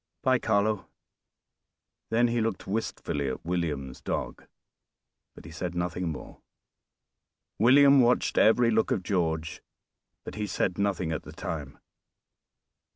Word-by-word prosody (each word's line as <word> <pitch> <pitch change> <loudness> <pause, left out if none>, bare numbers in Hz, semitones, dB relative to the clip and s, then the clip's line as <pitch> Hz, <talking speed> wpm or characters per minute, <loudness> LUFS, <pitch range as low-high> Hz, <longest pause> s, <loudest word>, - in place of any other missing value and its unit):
By, 130 -2 +3
Carlo." 105 -1 0 1.2
Then 120 +1 +3
he 120 0 0
looked 110 -4 -2
wistfully 95 -8 -3
at 65 - -5
William's 75 -7 -3
dog, - - -4 0.9
but - - -13
he 80 - -10
said 90 +2 -5
nothing 90 0 -2
more. 75 - -10 1.2
William 140 +4 +7
watched 125 +1 +2
every 115 +2 +5
look 110 0 +2
of 95 - 0
George, 80 -4 -1 0.6
but - - -8
he 105 -1 -3
said 90 -1 -1
nothing 95 -4 0
at 80 - -2
the - - -12
time. - - -6
100 Hz, 125 wpm, -28 LUFS, 85-115 Hz, 1.2 s, William